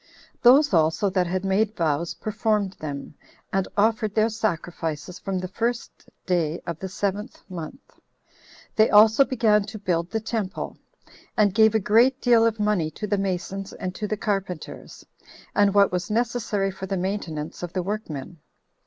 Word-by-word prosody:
Those 270 Hz, +2 st, +6 dB
also 165 Hz, +4 st, +2 dB
that 180 Hz, -2 st, +1 dB
had 185 Hz, +2 st, -2 dB
made 205 Hz, +3 st, +1 dB
vows 165 Hz, 0 st, -1 dB
performed 215 Hz, -2 st, -1 dB
them, 145 Hz, -2 st, -6 dB, 0.4 s
and 195 Hz, -1 st, +1 dB
offered 215 Hz, 0 st, +2 dB
their 220 Hz, +1 st, +3 dB
sacrifices 170 Hz, -6 st, -3 dB
from 195 Hz, -1 st, -3 dB
the 185 Hz, 0 st, -3 dB
first 235 Hz, +5 st, -4 dB, 0.2 s
day 170 Hz, -3 st, 0 dB
of 170 Hz, -2 st, -5 dB
the 190 Hz, -, -5 dB
seventh 200 Hz, +2 st, -3 dB
month. 180 Hz, -, -9 dB, 0.8 s
They 220 Hz, 0 st, +5 dB
also 220 Hz, +5 st, +7 dB
began 225 Hz, -5 st, +2 dB
to 215 Hz, +1 st, -8 dB
build 175 Hz, -4 st, -1 dB
the 225 Hz, -, -1 dB
temple, 215 Hz, -3 st, -4 dB, 0.6 s
and 205 Hz, -3 st, +4 dB
gave 220 Hz, +1 st, +5 dB
a -, -, +4 dB
great 235 Hz, +6 st, +4 dB
deal 235 Hz, -2 st, +5 dB
of 225 Hz, -1 st, -2 dB
money 205 Hz, -7 st, +1 dB
to 185 Hz, +7 st, -6 dB
the 205 Hz, -1 st, 0 dB
masons 195 Hz, +1 st, -3 dB
and 185 Hz, -1 st, -5 dB
to 210 Hz, +2 st, -4 dB
the 215 Hz, -, -2 dB
carpenters, 195 Hz, -5 st, -4 dB, 0.5 s
and 205 Hz, -1 st, +3 dB
what 200 Hz, -1 st, +5 dB
was 180 Hz, 0 st, -2 dB
necessary 225 Hz, -3 st, 0 dB
for 190 Hz, 0 st, -7 dB
the 195 Hz, 0 st, -2 dB
maintenance 175 Hz, -5 st, -4 dB
of 175 Hz, -1 st, -5 dB
the 185 Hz, -, -1 dB
workmen. 175 Hz, -6 st, -5 dB
200 Hz, 160 wpm, -24 LUFS, 180-220 Hz, 0.8 s, also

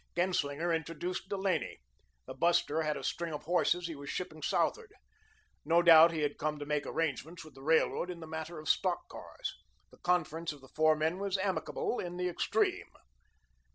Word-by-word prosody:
Genslinger 170 Hz, -2 st, 0 dB
introduced 165 Hz, +3 st, -3 dB
Delaney. 190 Hz, -5 st, -1 dB, 0.5 s
The -, -, -7 dB
buster 160 Hz, +1 st, +2 dB
had 150 Hz, -1 st, -1 dB
a -, -, -7 dB
string 170 Hz, -2 st, -2 dB
of 150 Hz, -, -7 dB
horses 180 Hz, +1 st, +1 dB
he 165 Hz, -, -4 dB
was 140 Hz, 0 st, -8 dB
shipping 155 Hz, -4 st, -5 dB
southward. -, -, 0 dB, 0.7 s
No 170 Hz, +3 st, +3 dB
doubt 165 Hz, -1 st, +9 dB
he 160 Hz, -2 st, -2 dB
had 145 Hz, -1 st, -1 dB
come 150 Hz, 0 st, -1 dB
to 145 Hz, -, -6 dB
make 150 Hz, 0 st, -1 dB
arrangements 160 Hz, +1 st, -3 dB
with 155 Hz, -, -14 dB
the 135 Hz, -, -14 dB
Railroad 160 Hz, +4 st, +2 dB
in 175 Hz, -1 st, -6 dB
the 160 Hz, -, -8 dB
matter 160 Hz, +1 st, -6 dB
of 155 Hz, 0 st, -8 dB
stock -, -, +1 dB
cars. -, -, -7 dB, 0.4 s
The -, -, -17 dB
conference 170 Hz, -2 st, 0 dB
of 145 Hz, -, -15 dB
the 130 Hz, -, -16 dB
four 155 Hz, 0 st, +4 dB
men 160 Hz, +4 st, 0 dB
was 200 Hz, -1 st, -1 dB
amicable 190 Hz, +5 st, -1 dB
in 175 Hz, 0 st, -5 dB
the 180 Hz, 0 st, 0 dB
extreme. 175 Hz, -, 0 dB
165 Hz, 185 wpm, -32 LUFS, 155-175 Hz, 0.7 s, doubt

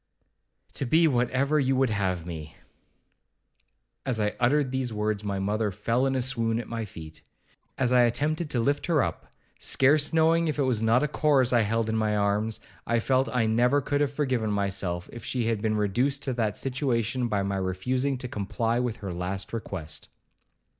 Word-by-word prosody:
'To 140 Hz, -, -2 dB
be 160 Hz, +5 st, +5 dB
whatever 130 Hz, +3 st, +1 dB
you 135 Hz, -1 st, +2 dB
would 130 Hz, -3 st, +2 dB
have 95 Hz, -5 st, -1 dB
me.' 80 Hz, -3 st, -7 dB, 1.5 s
As 125 Hz, -4 st, -1 dB
I 105 Hz, 0 st, 0 dB
uttered 130 Hz, +2 st, +2 dB
these 130 Hz, -2 st, -2 dB
words, 105 Hz, -1 st, -1 dB
my 100 Hz, -1 st, -2 dB
mother 105 Hz, +2 st, 0 dB
fell 115 Hz, +7 st, 0 dB
in 135 Hz, -, 0 dB
a 130 Hz, -, 0 dB
swoon 115 Hz, -3 st, 0 dB
at 120 Hz, -, -6 dB
my 115 Hz, -1 st, -4 dB
feet. 80 Hz, -5 st, -11 dB, 0.6 s
As 125 Hz, -1 st, +1 dB
I 125 Hz, -, +6 dB
attempted 150 Hz, +7 st, 0 dB
to 125 Hz, -, -1 dB
lift 140 Hz, +5 st, 0 dB
her 160 Hz, -5 st, +3 dB
up, -, -, -5 dB, 0.3 s
scarce 145 Hz, +2 st, +3 dB
knowing 165 Hz, +1 st, +3 dB
if 150 Hz, -, -1 dB
it 145 Hz, -, +2 dB
was 125 Hz, -5 st, +1 dB
not 115 Hz, +4 st, +3 dB
a -, -, +2 dB
corse 140 Hz, -4 st, +2 dB
I 120 Hz, -, +5 dB
held 115 Hz, +1 st, 0 dB
in 110 Hz, -, -1 dB
my 105 Hz, -1 st, +1 dB
arms, 105 Hz, +2 st, 0 dB, 0.3 s
I 120 Hz, 0 st, +2 dB
felt 130 Hz, +3 st, +1 dB
I 125 Hz, -3 st, +1 dB
never 120 Hz, +5 st, +3 dB
could 145 Hz, +1 st, -1 dB
have 145 Hz, -2 st, +1 dB
forgiven 130 Hz, -6 st, -1 dB
myself 95 Hz, -4 st, -1 dB
if 120 Hz, -, -8 dB
she 125 Hz, -3 st, -1 dB
had 115 Hz, -2 st, 0 dB
been 110 Hz, -1 st, 0 dB
reduced 125 Hz, +8 st, 0 dB
to 130 Hz, -, -1 dB
that 110 Hz, -3 st, -1 dB
situation 125 Hz, -2 st, -1 dB
by 105 Hz, -3 st, 0 dB
my 100 Hz, 0 st, -1 dB
refusing 125 Hz, +9 st, -1 dB
to 125 Hz, 0 st, -5 dB
comply 115 Hz, +2 st, -1 dB
with 125 Hz, -3 st, -1 dB
her 95 Hz, -, -3 dB
last 95 Hz, +4 st, -4 dB
request. 95 Hz, -8 st, -5 dB
120 Hz, 190 wpm, -27 LUFS, 105-135 Hz, 1.5 s, I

